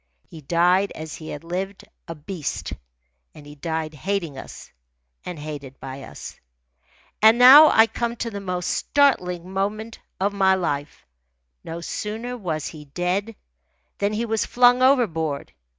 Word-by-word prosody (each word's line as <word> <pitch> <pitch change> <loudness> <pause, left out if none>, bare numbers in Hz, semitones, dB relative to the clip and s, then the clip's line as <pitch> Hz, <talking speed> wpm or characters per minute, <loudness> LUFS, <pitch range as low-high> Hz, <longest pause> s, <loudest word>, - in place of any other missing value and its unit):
He 160 - -12
died 180 +6 +2
as 155 -1 -7
he 155 - -9
had 145 - -7
lived, 190 +3 -4 0.2
a 165 - -6
beast, 160 +1 -5 0.6
and 150 - -13
he 145 - -11
died 160 +1 -4
hating 170 0 -3
us 135 - -10 0.5
and 180 -2 -6
hated 145 -3 -8
by 135 0 -8
us. - - -10 0.8
And 220 +2 +7
now 270 +5 +10
I 225 - +6
come 235 +1 -3
to 230 0 -4
the 200 -1 -6
most 180 -2 -2
startling 185 -11 +1
moment 210 +4 -3 0.2
of 200 +2 0
my 190 -1 +3
life. 145 - -3 0.6
No 165 +1 -6
sooner 220 +7 -5
was 165 - -4
he 150 -2 -8
dead 180 +9 -2 0.6
than 200 +1 0
he 225 +2 -1
was 225 -1 0
flung 245 0 +4
overboard. 165 - +1
180 Hz, 150 wpm, -23 LUFS, 155-220 Hz, 0.8 s, now